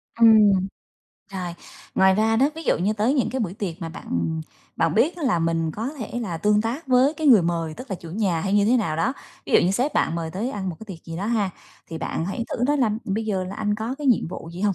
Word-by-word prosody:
Ừm. 215 Hz, -5 st, +6 dB, 0.7 s
Rồi, 180 Hz, -3 st, -4 dB, 0.4 s
ngoài 190 Hz, 0 st, +5 dB
ra 220 Hz, +2 st, +2 dB
đó, 270 Hz, +5 st, +3 dB
ví 325 Hz, -, -7 dB
dụ -, -, +1 dB
như 195 Hz, +5 st, +1 dB
tới 220 Hz, +5 st, +1 dB
những 265 Hz, -, +1 dB
cái 260 Hz, -, -2 dB
buổi 190 Hz, -5 st, -2 dB
tiệc 190 Hz, -4 st, -5 dB
mà 165 Hz, -, -4 dB
bạn, -, -, -10 dB
ừm, 160 Hz, -, -1 dB, 0.4 s
bạn 165 Hz, -1 st, +1 dB
biết 310 Hz, +10 st, +2 dB
á, 340 Hz, -, -7 dB
là 240 Hz, -11 st, +2 dB
mình 165 Hz, -1 st, 0 dB
có 225 Hz, +4 st, -3 dB
thể 240 Hz, 0 st, -4 dB
là 185 Hz, -8 st, -3 dB
tương 210 Hz, +5 st, +2 dB
tác 240 Hz, +9 st, -3 dB
với 260 Hz, +3 st, +4 dB
cái 315 Hz, -1 st, -2 dB
người 235 Hz, -9 st, +7 dB
mời, 165 Hz, -2 st, -1 dB
tức 255 Hz, +9 st, -10 dB
là 195 Hz, -, -2 dB
chủ 170 Hz, -1 st, -11 dB
nhà 185 Hz, -3 st, 0 dB
hay 195 Hz, +4 st, -2 dB
như 205 Hz, 0 st, +4 dB
thế 235 Hz, +4 st, +4 dB
nào 165 Hz, -10 st, -1 dB
đó. 220 Hz, +10 st, +1 dB, 0.3 s
Ví -, -, -5 dB
dụ -, -, +8 dB
như 180 Hz, -, +2 dB
sếp 250 Hz, +9 st, 0 dB
bạn -, -, +1 dB
mời 165 Hz, -1 st, -3 dB
tới 210 Hz, +9 st, -3 dB
ăn 195 Hz, -6 st, -4 dB
một 170 Hz, -, -5 dB
cái -, -, -8 dB
tiệc -, -, -23 dB
gì 165 Hz, -1 st, -7 dB
đó 195 Hz, +4 st, -3 dB
ha, 215 Hz, -4 st, +1 dB, 0.4 s
thì 165 Hz, -, -5 dB
bạn 160 Hz, -, -3 dB
hãy 225 Hz, +5 st, -3 dB
thử 245 Hz, -, -1 dB
nói 290 Hz, +1 st, +2 dB
là: 245 Hz, -5 st, +3 dB
"Bây 210 Hz, +3 st, -2 dB
giờ 195 Hz, -4 st, -1 dB
là 185 Hz, +2 st, -6 dB
anh 210 Hz, -1 st, 0 dB
có 220 Hz, +4 st, -3 dB
cái 295 Hz, -, -3 dB
nhiệm 245 Hz, -9 st, +3 dB
vụ 165 Hz, -, -7 dB
gì 175 Hz, -, -8 dB
hông, 205 Hz, -1 st, +2 dB
205 Hz, 280 wpm, -23 LUFS, 175-235 Hz, 0.7 s, dụ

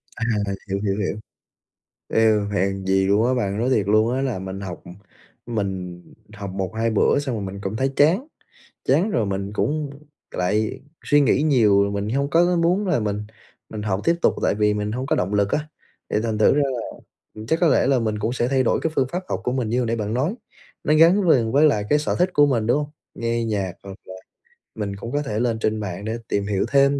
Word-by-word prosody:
À, 120 Hz, -, -3 dB, 0.2 s
h -, -, -1 dB, 0.2 s
hiểu, 100 Hz, +1 st, -1 dB
hiểu, 100 Hz, -1 st, 0 dB
hiểu. 100 Hz, 0 st, -2 dB, 0.9 s
Ê, 110 Hz, 0 st, +4 dB, 0.2 s
hèn 95 Hz, -1 st, -1 dB
gì 95 Hz, 0 st, +2 dB
luôn 105 Hz, +4 st, +3 dB
á 130 Hz, -, +2 dB
bạn, 100 Hz, -5 st, -1 dB
nói 120 Hz, +3 st, 0 dB
thiệt 110 Hz, -7 st, +2 dB
luôn 110 Hz, +3 st, +3 dB
á 135 Hz, -, -1 dB
là 130 Hz, -7 st, -1 dB
mình 95 Hz, +1 st, -6 dB
học 90 Hz, -3 st, -7 dB, 0.6 s
mình 95 Hz, -6 st, -4 dB, 0.3 s
học 100 Hz, -2 st, -6 dB
1,2 95 Hz, +4 st, -2 dB
bữa 110 Hz, +5 st, +3 dB
xong 140 Hz, -3 st, -2 dB
rồi 105 Hz, -, -4 dB
mình 100 Hz, +1 st, -6 dB
cũng 100 Hz, +2 st, -4 dB
thấy 135 Hz, +3 st, 0 dB
chán, 175 Hz, -, +3 dB, 0.6 s
chán 165 Hz, +11 st, +2 dB
rồi 115 Hz, -, 0 dB
mình 100 Hz, 0 st, -3 dB
cũng 150 Hz, +6 st, -1 dB, 0.4 s
lại 105 Hz, +4 st, -1 dB, 0.2 s
suy 145 Hz, -, +4 dB
nghĩ 140 Hz, 0 st, +3 dB
nhiều. 105 Hz, -9 st, +4 dB
Mình 100 Hz, +1 st, -2 dB
hông 140 Hz, +3 st, 0 dB
có 170 Hz, +1 st, +4 dB
có 180 Hz, 0 st, +1 dB
muốn 175 Hz, +5 st, +1 dB
là 180 Hz, -10 st, +1 dB
mình 105 Hz, 0 st, -3 dB, 0.4 s
mình 105 Hz, -1 st, -5 dB
học 100 Hz, -2 st, -1 dB
tiếp 170 Hz, 0 st, +3 dB
tục -, -, +3 dB
tại -, -, +2 dB
vì 105 Hz, 0 st, +2 dB
mình 105 Hz, 0 st, -2 dB
hông 130 Hz, +3 st, -3 dB
có -, -, +1 dB
động 95 Hz, +3 st, -1 dB
lực 100 Hz, -1 st, +2 dB
á, 150 Hz, 0 st, -1 dB, 0.4 s
thì -, -, 0 dB
thành 110 Hz, -2 st, -2 dB
thử 110 Hz, -, +5 dB
ra 145 Hz, -, +3 dB, 0.7 s
là 110 Hz, -, -8 dB
chắc 160 Hz, +6 st, +1 dB
có 175 Hz, -, +5 dB
lẽ 145 Hz, -, +3 dB
là 135 Hz, -2 st, +3 dB
mình 110 Hz, -2 st, -2 dB
cũng 110 Hz, +3 st, -1 dB
sẽ 120 Hz, -1 st, 0 dB
thay 130 Hz, 0 st, +2 dB
đổi -, -, +1 dB
cái 160 Hz, -, 0 dB
phương 130 Hz, -, +2 dB
pháp 180 Hz, +2 st, -3 dB
học -, -, -2 dB
của 125 Hz, -, -1 dB
mình 125 Hz, -4 st, -1 dB
như 120 Hz, -, 0 dB
hồi 125 Hz, -, 0 dB
nãy 115 Hz, -, 0 dB
bạn 105 Hz, -1 st, -3 dB
nói, 145 Hz, -, 0 dB, 0.5 s
nó 150 Hz, -, +2 dB
gắn 170 Hz, +4 st, +5 dB
liền 115 Hz, -7 st, +3 dB
với 145 Hz, +5 st, +5 dB
lại 105 Hz, -8 st, +1 dB
cái 150 Hz, -, +4 dB
sở 150 Hz, -, -1 dB
thích 180 Hz, +1 st, +3 dB
của 145 Hz, -, +5 dB
mình, 115 Hz, -6 st, 0 dB
đúng 145 Hz, +5 st, +2 dB
không? 145 Hz, -, -19 dB, 0.2 s
Nghe 115 Hz, 0 st, -1 dB
nhạc 100 Hz, -5 st, -2 dB
hoặc 100 Hz, 0 st, -9 dB
là 95 Hz, -, -9 dB, 0.6 s
mình 100 Hz, -2 st, -4 dB
cũng 110 Hz, +4 st, -7 dB
có 145 Hz, +2 st, 0 dB
thể 110 Hz, -7 st, -3 dB
lên 115 Hz, -2 st, 0 dB
trên 110 Hz, -1 st, 0 dB
mạng 100 Hz, -1 st, -5 dB
để 110 Hz, +1 st, -2 dB
tìm 100 Hz, 0 st, -1 dB
hiểu 100 Hz, -2 st, 0 dB
thêm 140 Hz, 0 st, +4 dB
110 Hz, 240 wpm, -22 LUFS, 100-140 Hz, 0.9 s, thử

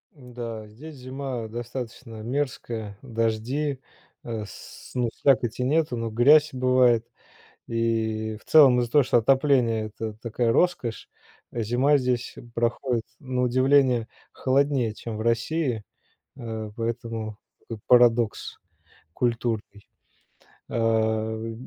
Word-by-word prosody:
М-да, 120 Hz, -4 st, -7 dB
здесь 145 Hz, +9 st, -11 dB
зима 130 Hz, -2 st, -5 dB
достаточно 120 Hz, 0 st, -7 dB
мерзкая, 115 Hz, -5 st, -3 dB
дожди, 125 Hz, +4 st, -1 dB, 0.4 s
э, 115 Hz, -2 st, -4 dB
с -, -, -12 dB
ну, 125 Hz, -2 st, +1 dB
слякоти 125 Hz, -3 st, +1 dB
нету, 150 Hz, -2 st, +1 dB
но 115 Hz, 0 st, -2 dB
грязь 145 Hz, +7 st, +5 dB
бывает. 125 Hz, -2 st, +3 dB, 0.6 s
И 110 Hz, -1 st, -1 dB
в -, -, -24 dB
целом 135 Hz, -6 st, +6 dB
из-за 120 Hz, -1 st, -2 dB
того, 145 Hz, +3 st, +5 dB
что 120 Hz, -1 st, +3 dB
отопление- 125 Hz, -3 st, +2 dB
это 110 Hz, 0 st, -6 dB
такая 115 Hz, 0 st, 0 dB
роскошь, 175 Hz, -10 st, 0 dB, 0.4 s
зима 120 Hz, +6 st, +2 dB
здесь 125 Hz, -2 st, -1 dB, 0.2 s
проходит 120 Hz, 0 st, 0 dB
на 130 Hz, -2 st, -2 dB
удивление 130 Hz, -1 st, +3 dB, 0.3 s
холоднее, 135 Hz, -4 st, +1 dB
чем 110 Hz, 0 st, -6 dB
в -, -, -5 dB
России, 115 Hz, +1 st, 0 dB, 0.6 s
э, 110 Hz, -4 st, -6 dB
поэтому 115 Hz, -2 st, -4 dB, 0.2 s
такой 115 Hz, -2 st, -9 dB
парадокс 120 Hz, -2 st, +3 dB, 0.6 s
культурный. 115 Hz, -4 st, -2 dB, 0.8 s
Э, 110 Hz, 0 st, 0 dB
120 Hz, 110 wpm, -25 LUFS, 110-130 Hz, 0.8 s, целом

